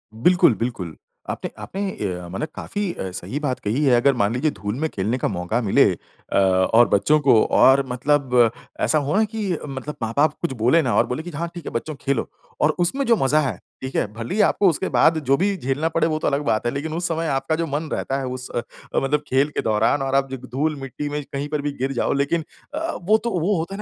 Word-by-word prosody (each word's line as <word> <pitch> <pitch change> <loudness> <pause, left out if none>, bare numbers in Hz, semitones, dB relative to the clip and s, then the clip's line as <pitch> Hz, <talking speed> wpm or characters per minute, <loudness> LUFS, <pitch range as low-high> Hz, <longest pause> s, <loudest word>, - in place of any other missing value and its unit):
बिल्कुल, 175 +5 +4
बिल्कुल। 110 -9 -4 0.3
आपने - - -4
आपने 195 - -5
अ, 90 - -4
माने 95 +11 -2
काफ़ी 205 -2 -3
अ, 95 - -5
सही 110 +9 -5
बात 140 -4 -2
कही 115 +8 -1
है। 130 -4 +5
अगर 135 +4 +4
मान 100 +2 +2
लीजिए 145 +5 +1
धूल 105 0 -4
में 160 +1 0
खेलने 105 +3 -1
का - - -1
मौका 90 +4 -1
मिले 100 - +4 0.5
अ, - - +2
और 95 +5 +4
बच्चों 150 +10 +3
को 130 -6 +5
और 135 +1 +5
मतलब 125 -2 +2 0.3
ऐसा 155 - +3
हो 145 +2 0
ना 220 - +4
कि 215 -3 -2 0.2
मतलब 140 +2 -6
माँ-बाप 140 +7 +2
कुछ 170 -6 -1
बोले 145 +8 +5
ना, 125 -7 0
और - - +4
बोले 150 +6 -3
कि, 175 - -7
"हाँ, 170 +3 -3
ठीक 170 -3 -8
है - - -5
बच्चों, 150 +6 -3
खेलो।" 140 -2 0 0.3
और - - +5
उसमें 265 +11 +1
जो 235 - +4
मज़ा 145 0 +3
है, 135 - -1 0.3
ठीक 130 0 -6
है, - - +2
भले 115 - -5
ही 215 - +3
आपको 200 -1 +4
उसके 175 +3 -1
बाद 160 - +5
जो 135 +2 +3
भी 200 +3 +1
झेलना 145 +2 -1
पड़े 165 0 +1
वो 155 -1 -1
तो - - -1
अलग 140 0 +1
बात 110 -3 +1
है, 120 - +1
लेकिन 155 +3 -3
उस 175 +2 -1
समय 165 -1 -1
आपका 160 +3 -1
जो 165 +1 -2
मन 150 +2 -3
रहता 135 +1 -2
है 135 - -3
उस 125 0 -6
अ, 120 - -1 0.3
मतलब 150 +2 +1
खेल 135 +3 +2
के - - +2
दौरान, 110 +6 +2
और 135 0 -1
आप 135 0 +2
जो 135 - -3
ग 130 +1 -12
धूल-मिट्टी 145 0 -2
में 145 0 -3
कहीं 140 +1 -5
पर 150 -1 -1
भी 145 - -2
गिर 135 +1 0
जाओ, 125 - 0
लेकिन 140 +4 0 0.3
अ, 325 +2 -2
वो 210 +5 +4
तो 235 - -1
वो 190 +4 +1
होता 165 +4 -3
है - - -7
140 Hz, 245 wpm, -22 LUFS, 120-160 Hz, 0.5 s, है